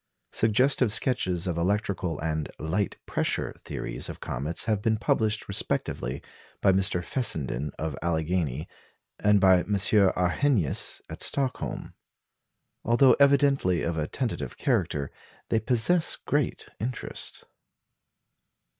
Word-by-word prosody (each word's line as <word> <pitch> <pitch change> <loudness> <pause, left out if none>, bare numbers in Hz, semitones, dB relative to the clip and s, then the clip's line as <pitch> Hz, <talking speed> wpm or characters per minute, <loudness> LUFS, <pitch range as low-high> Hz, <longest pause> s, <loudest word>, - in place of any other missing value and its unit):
Suggestive 125 +2 +3
sketches 95 -7 +1
of 85 -2 -2
electrical 95 -3 -1
and 80 -1 -2
"light 90 +7 -2
pressure" - - -1
theories - - -4
of - - -7
comets 75 +6 -3
have 110 -3 0
been 110 +1 +1
published 110 0 0
respectively 70 -8 -2 0.4
by 95 - +4
Mr. 95 -2 +1
Fessenden 75 - 0
of 80 -2 -3
Alleghany, 80 -2 -1 0.5
and 105 -1 +4
by 95 -1 +6
M. 100 +3 -1
Arrhenius 95 - +2
at - - -7
Stockholm. 135 -2 -1 0.9
Although 120 +2 +5
evidently 140 - +3
of 85 - -1
a 75 -1 -2
tentative 125 -4 -4
character, 70 -1 0 0.4
they 110 - +2
possess 125 +10 +2
great - - -2
interest. 120 +4 -4
95 Hz, 110 wpm, -27 LUFS, 80-115 Hz, 0.9 s, by